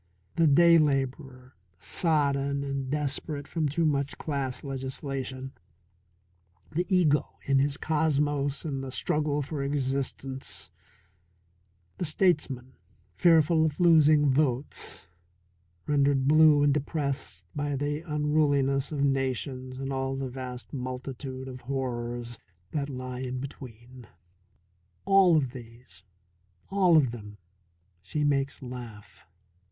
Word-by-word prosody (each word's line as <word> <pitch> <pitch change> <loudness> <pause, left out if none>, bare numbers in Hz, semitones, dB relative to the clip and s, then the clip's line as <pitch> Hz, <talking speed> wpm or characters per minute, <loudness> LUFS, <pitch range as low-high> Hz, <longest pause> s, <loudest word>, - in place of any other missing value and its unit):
The 165 -1 +4
day 170 +3 +6
labourer, 135 -3 -1 0.2
sodden 140 - 0
and 140 -1 -3
desperate 145 0 -2
from 155 -3 -1
too 165 +4 0
much 140 -2 0
class 140 -4 -3
legislation, 135 -1 -5 1.2
the 175 +3 -1
ego 170 -6 +2
in 135 -1 +2
his 140 +1 +1
cosmos 145 -2 0
and 135 -3 -3
the 135 - -5
struggle 150 +1 0
for 145 +1 -4
existence; 135 -1 -2 1.3
the 180 - 0
statesman, 150 -7 +1 0.4
fearful 160 - +4
of 155 0 -1
losing 155 -4 +5
votes, 135 -1 -1 0.8
rendered 140 -2 +2
blue 155 -1 +6
and 145 -1 +4
depressed 140 - -3
by 145 -1 -1
the 145 +2 -1
unruliness 150 -3 +1
of 145 -2 -1
nations 130 -1 -1
and 135 0 -4
all 135 0 -2
the 135 -1 -3
vast 125 0 -8
multitude 130 0 -5
of 130 -1 -8
horrors 120 -2 -4 0.3
that 145 -2 -2
lie 130 -1 -6
in 130 0 -4
between 125 -2 -10 1.0
all 195 -4 +6
of 135 -5 0
these, 115 -7 -11 0.7
all 185 -4 +5
of 135 -6 +3
them, 105 -3 -9 0.6
she 150 - -2
makes 140 -1 0
laugh. 120 -7 -10
140 Hz, 115 wpm, -28 LUFS, 130-150 Hz, 1.3 s, day